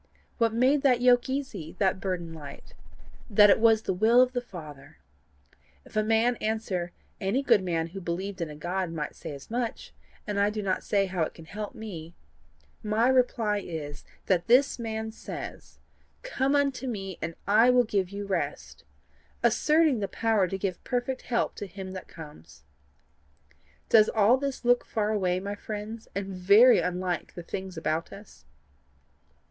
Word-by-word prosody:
What 230 -1 +3
made 260 +5 +3
that 255 -4 +3
yoke 245 +1 +4
easy, 260 - -4
that 190 -1 +1
burden 180 -3 -3
light? 145 -3 -11 0.6
That 205 -1 +7
it - - +4
was 220 -1 +4
the - - -1
will 220 +6 +4
of 255 0 +5
the 245 - -1
Father. 155 - -11 0.9
If - - -17
a 215 - +3
man 225 +2 +2
answer: 210 -5 -2 0.3
'Any 205 +9 0
good 230 -7 +4
man 170 -3 -1
who 195 +3 -8
believed 185 +2 -4
in 165 - -2
a 150 - -8
God, 175 +3 -3
might 155 -3 -4
say - - -8
as 140 +8 -11
much, 240 -1 -3 0.3
and 205 -1 -2
I 200 +1 +3
do 210 0 -4
not 190 -1 -1
see 200 -1 +1
how 185 -2 -3
it 160 - -1
can 165 - -12
help 210 +7 -7
me;' 175 -7 -8 0.7
my 220 +3 +2
reply 240 -5 +2
is, 155 -6 -7 0.2
that 180 0 +1
this 255 +3 +4
man 220 -1 -4
says, 220 - -8 0.5
COME 280 - 0
UNTO 275 -2 0
ME, 195 -6 -5
AND 165 +1 -4
I 220 +5 +5
WILL 250 0 +5
GIVE 200 -5 -1
YOU 200 +1 -6
REST 190 -3 -4 0.6
asserting 305 -5 +3
the 200 - -1
power 215 0 +1
to 195 - -3
give 190 -2 -3
perfect 255 +1 -2
help 235 - -1
to 205 - -5
him 190 0 -8
that 185 -1 -8
comes. 115 - -13 1.2
Does 215 -2 +6
all 220 +3 +4
this 275 -2 -4
look 245 0 +4
far 215 -1 -1
away, 185 -4 0
my 200 +2 -4
friends, 215 +2 -7
and 200 0 -2
very 200 +6 +5
unlike 180 -1 -2
the 175 - -7
things 190 0 -6
about 160 0 -2
us? 200 - -13
205 Hz, 170 wpm, -27 LUFS, 180-235 Hz, 1.2 s, That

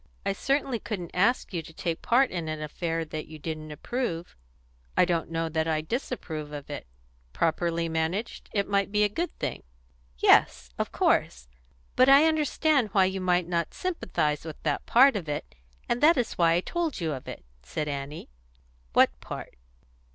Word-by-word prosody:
"I 195 - +1
certainly 270 +2 0
couldn't 180 -7 -5
ask 205 +4 +2
you 170 - -1
to 160 - -13
take 165 0 -3
part 255 +2 +3
in 170 -3 -3
an 155 0 -3
affair 165 +2 -3
that 155 0 -6
you 155 - -10
didn't 155 0 -5
approve." 170 - -4 0.6
"I - - +6
don't 170 -3 -1
know 165 0 -1
that 160 0 -1
I 155 -1 +1
disapprove 160 - -4
of 145 -1 -7
it. 145 - -6 0.5
Properly 170 0 0
managed, 165 +7 -2
it 200 -2 0
might 200 -1 +1
be 210 0 +3
a - - +5
good 340 - -2
thing." - - -3 0.6
"Yes, - - +4
of - - -1
course. - - +1 0.5
But 255 +1 +6
I 280 +3 +8
understand 305 -5 +2
why 190 -2 +5
you 190 0 -2
might 180 -1 +2
not 170 -2 -1
sympathise 180 - -1
with 160 -2 -7
that 150 -2 -1
part 265 +2 +6
of 175 -7 -3
it, 65 - -4 0.3
and 240 - 0
that 320 +2 +6
is 245 -3 0
why 165 -1 +3
I 170 - +2
told 340 - -2
you 165 -3 -1
of 130 - -8
it," - - -8 0.2
said 150 - -4
Annie. 140 - -5 0.6
"What - - +6
part?" - - -8
170 Hz, 180 wpm, -27 LUFS, 155-230 Hz, 0.6 s, I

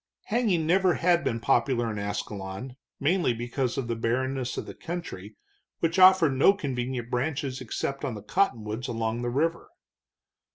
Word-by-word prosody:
Hanging 210 -8 +1
never 180 +1 +3
had 170 -1 +2
been 115 -4 -1
popular 120 -2 +1
in 105 - -4
Ascalon, 100 +3 -5 0.2
mainly 155 -4 +2
because 120 +2 -2
of 130 -3 -2
the 115 - -1
barrenness 130 +3 -1
of - - -3
the - - -8
country, 110 - -7 0.4
which 165 +3 +1
offered 185 -4 +7
no 135 +9 +5
convenient 125 - -3
branches 135 0 -2
except 135 +3 -3
on 130 -5 -2
the 105 - -8
cottonwoods 115 - -1
along 115 0 -2
the 120 - -1
river. 165 +7 -1
130 Hz, 155 wpm, -27 LUFS, 115-165 Hz, 0.4 s, offered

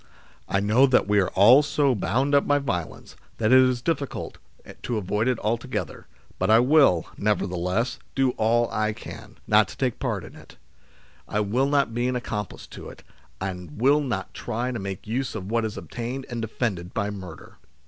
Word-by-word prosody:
" - - -29
I 100 - +1
know 110 +7 +4
that 130 -6 +3
we 105 0 +3
are 95 - +1
all 115 +9 +8
so 145 -2 +1
bound 125 +7 0
up 140 - +4
by 145 - +4
violence, 100 - -4 0.2
that 110 +1 +1
it 130 - +8
is 130 -2 +2
difficult 145 -3 -3 0.4
to 120 - -2
avoid 105 +3 -1
it 125 -2 +1
altogether, 115 +4 -3 0.3
but - - 0
I 110 - +7
will, 125 - +4
nevertheless, 100 +2 -1 0.2
do 135 -2 +2
all 120 +1 +2
I 110 0 0
can, - - -11
not - - +4
to - - -11
take - - -1
part - - -2
in - - -12
it: - - -15 0.7
I 105 - -1
will 120 +7 +1
not 140 -4 +1
be 120 +1 0
an 125 - -1
accomplice 105 -4 -5
to - - -9
it, - - -14 0.4
and 90 -3 -6
will 140 +5 +4 0.3
try 120 +3 -3
not - - -5
to 120 - -3
make 95 -1 -6
use 125 +4 -3
of 100 -1 -6
what 115 -1 +1
is 110 - -5
obtained 125 +3 -5
and 120 -1 -3
defended 100 -5 -3
by 105 -1 -1
murder. 95 -5 -10
115 Hz, 190 wpm, -25 LUFS, 100-130 Hz, 0.7 s, all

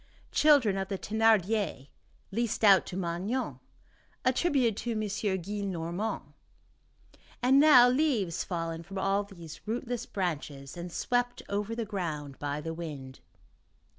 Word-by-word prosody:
Children 280 -10 +4
of 190 - -2
the 195 - -3
Thénardiers, 215 -8 +1 0.4
leased 230 +1 -1
out 195 -3 +6
to 185 - -5
Magnon, 185 - -2 0.7
attributed 255 - +2
to 240 - -2
M. 215 - -2
Gillenormand, 200 -1 -2 1.2
and 265 +2 +6
now 280 -5 +8
leaves 245 - +1
fallen 165 -2 -3
from 195 +4 -9
all 195 +1 +1
these 170 -6 -11
rootless 245 +1 -3
branches, 145 -7 -4
and 175 0 -6
swept 245 +5 -1
over 205 +3 -2
the 230 -1 -2
ground 155 -9 -4
by 145 0 -2
the 165 +2 -4
wind. 145 -6 -7
200 Hz, 125 wpm, -29 LUFS, 170-230 Hz, 1.2 s, now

